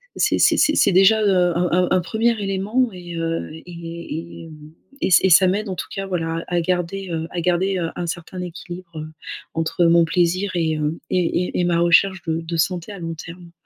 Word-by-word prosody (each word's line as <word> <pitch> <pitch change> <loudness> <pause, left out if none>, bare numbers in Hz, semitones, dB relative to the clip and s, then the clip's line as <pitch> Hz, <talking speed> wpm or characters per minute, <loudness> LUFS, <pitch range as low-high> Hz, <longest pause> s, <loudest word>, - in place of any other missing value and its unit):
c'est - - +2
c'est - - +5
c'est 305 - +3
c'est 200 - +4
déjà, 195 +4 +5
heu, 180 -4 +3
un 180 +1 +1
un 180 +1 +3
un 185 - +4
1er 225 +5 0
élément, 200 +6 0
et 175 -1 -8
heu, 165 0 -2
et 170 0 -8
et - - -11
mmh 155 0 -13 0.3
et - - 0
et 190 - +3
ça 185 +2 +7
m'aide 200 +3 -1
en 185 - -3
tout 175 - -4
cas 195 0 -4
voilà, 165 -3 -2
à 175 -1 0
garder, 180 +2 -2
heu, 160 0 -3
à 175 - -4
garder, 180 +3 +1
heu, 170 -2 -2
un 175 - -4
certain 175 +2 -6
équilibre 175 -2 -8 0.5
entre 165 +2 0
mon 170 0 +5
plaisir 180 +3 0
et 160 -2 0
heu, 150 +2 -2
et 180 0 0
et - - +2
ma 170 -1 +1
recherche 180 +2 +3
de 165 0 -1
de 165 +1 -4
santé 175 +3 -1
à 200 - -8
long 165 -1 -4
terme. 170 +2 -11
175 Hz, 210 wpm, -21 LUFS, 165-190 Hz, 0.5 s, ça